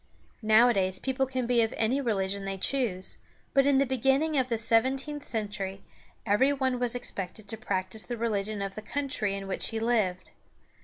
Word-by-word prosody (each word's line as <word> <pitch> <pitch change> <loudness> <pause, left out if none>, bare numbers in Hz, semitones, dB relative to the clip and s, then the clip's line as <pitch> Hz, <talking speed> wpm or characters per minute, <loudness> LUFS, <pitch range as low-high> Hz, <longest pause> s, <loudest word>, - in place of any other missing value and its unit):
Nowadays 215 -4 +4
people 265 +2 -1
can 260 -1 -2
be 240 -1 +3
of 225 - 0
any 245 +5 +1
religion 200 -5 -1
they 195 0 -3
choose, 190 -5 -1 0.3
but 275 0 +4
in 280 -1 +4
the 275 - +4
beginning 270 +4 +1
of 260 -2 +2
the 230 - 0
seventeenth 265 +6 +1
century 205 -4 -3 0.4
every 235 +7 +3
one 260 -3 0
was 245 -1 +1
expected 205 -3 -2
to 225 - -1
practice 190 0 -2
the 240 +1 -5
religion 210 -2 -1
of 195 0 -4
the 215 - -7
country 265 -5 -2
in 195 0 -5
which 190 - -1
he 225 - -2
lived. 215 -6 0
225 Hz, 175 wpm, -28 LUFS, 200-265 Hz, 0.4 s, Nowadays